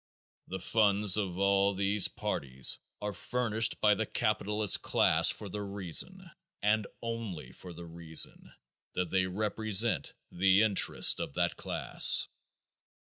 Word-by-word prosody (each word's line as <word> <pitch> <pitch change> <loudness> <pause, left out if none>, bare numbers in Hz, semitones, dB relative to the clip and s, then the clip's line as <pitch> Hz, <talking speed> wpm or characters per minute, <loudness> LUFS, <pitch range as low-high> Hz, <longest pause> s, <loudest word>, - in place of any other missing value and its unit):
The 95 - -6
funds 100 0 +2
of 95 -4 -3
all 100 0 +1
these 100 +1 +2
parties 65 -1 -1 0.2
are 105 0 -4
furnished 115 +1 -1
by 105 -1 +3
the 110 +1 -3
capitalist 105 -1 +1
class - - +3
for 105 - -2
the 105 +2 -7
reason, 100 - -2 0.4
and 105 0 0 0.2
only 115 -7 -7
for 90 - -12
the 85 0 -11
reason, 80 -1 -2 0.4
that 90 -2 -3
they 95 -1 0
represent 110 +3 0 0.2
the 95 +3 +2
interests 105 -3 +2
of 70 - -7
that 85 0 -1
class. - - +2
100 Hz, 125 wpm, -29 LUFS, 90-110 Hz, 0.4 s, by